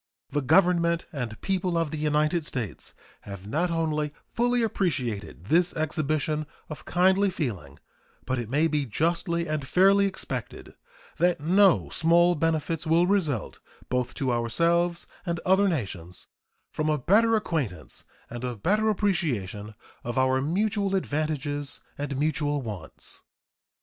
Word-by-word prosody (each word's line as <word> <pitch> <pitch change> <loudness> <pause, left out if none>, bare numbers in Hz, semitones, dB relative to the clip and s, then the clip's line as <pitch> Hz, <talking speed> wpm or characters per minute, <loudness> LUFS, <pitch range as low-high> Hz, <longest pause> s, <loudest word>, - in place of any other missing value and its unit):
The 145 +1 0
Government 170 +2 +3
and 120 -6 -4
people 185 -2 0
of 165 -3 0
the 155 - -3
United 150 +2 +1
States 120 - -5 0.3
have 100 -1 -9
not 155 - 0
only 155 -3 -1
fully 245 0 +1
appreciated 120 - -2
this 175 - +2
exhibition 155 -1 -1 0.2
of 155 - -8
kindly 190 +3 +3
feeling, 100 - -4 0.5
but 130 -1 -1
it 115 -2 -5
may 145 +5 +2
be 150 -3 -1
justly 170 - 0
and 155 -4 -3
fairly 195 +4 +5
expected 195 - -6 0.4
that 175 -2 +2
no 185 +5 +4
small 170 +2 +4
benefits 165 0 -1
will 165 +2 +4
result 165 - 0 0.3
both 125 -1 -1
to 130 -2 0
ourselves 170 +9 +1 0.2
and 170 -2 -2
other 190 +2 +4
nations 95 - -4 0.4
from 155 0 -1
a 155 - +2
better 215 - +4
acquaintance, 140 - -3 0.2
and 120 0 -7
a 125 -1 -2
better 210 - +1
appreciation 120 - -1 0.3
of 120 +2 -4
our 130 0 +3
mutual 200 +5 0
advantages 145 -4 -2 0.2
and 145 -2 -3
mutual 145 -1 0
wants. 100 -9 -7
155 Hz, 135 wpm, -26 LUFS, 130-175 Hz, 0.5 s, fairly